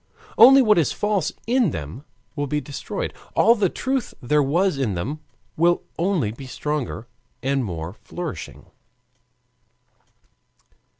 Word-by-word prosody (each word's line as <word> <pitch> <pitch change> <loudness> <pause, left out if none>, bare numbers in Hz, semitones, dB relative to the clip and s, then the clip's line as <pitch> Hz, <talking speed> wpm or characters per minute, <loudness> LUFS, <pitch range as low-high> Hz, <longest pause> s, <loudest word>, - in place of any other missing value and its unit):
Only 265 +3 +8
what 210 -6 +5
is 155 - +1
false 205 -5 0
in 245 -3 +3
them 80 - -7 0.3
will 145 0 -2
be 150 +2 0
destroyed; 140 0 -5 0.2
all 230 - +6
the 205 -5 +1
truth 260 +3 -2
there 150 +4 +2
was 160 +3 +1
in 115 -8 0
them 130 - -4 0.4
will 175 +2 +2 0.2
only 170 - +1
be 130 +4 -10
stronger 135 -4 -4 0.4
and 135 0 +1
more 85 -4 -5
flourishing. 135 - -7
150 Hz, 125 wpm, -23 LUFS, 125-195 Hz, 0.4 s, Only